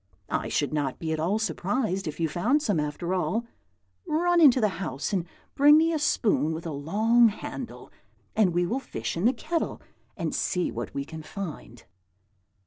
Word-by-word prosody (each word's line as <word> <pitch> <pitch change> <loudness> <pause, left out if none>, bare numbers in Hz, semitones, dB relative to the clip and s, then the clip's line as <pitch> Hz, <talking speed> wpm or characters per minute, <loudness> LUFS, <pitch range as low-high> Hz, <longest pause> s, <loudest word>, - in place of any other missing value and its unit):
I - - -1
should - - 0
not 145 -4 -1
be 160 -1 -2
at 160 - -2
all 180 +7 +1
surprised 205 -2 -1
if 155 - -5
you 165 - +2
found 235 - +1
some, 200 - +1
after 150 +4 -2
all. 220 +5 0 0.6
Run 345 +3 +2
into 270 -5 +7
the 215 - +3
house 145 +2 -3
and 180 -3 0 0.3
bring 295 +2 +7
me 325 +1 +3
a 315 - 0
spoon 205 - +1
with 160 +1 -6
a 165 - -3
long 215 +11 +3
handle, 205 - -7 0.4
and 205 -5 +4
we 175 +1 +1
will 240 +10 -1
fish - - -5
in 170 +5 -1
the 240 - +6
kettle, 330 +3 -2 0.4
and - - -2
see 180 -1 0
what - - -5
we 140 - -2
can 160 +1 -8
find." 180 +1 -8
195 Hz, 185 wpm, -27 LUFS, 160-245 Hz, 0.6 s, into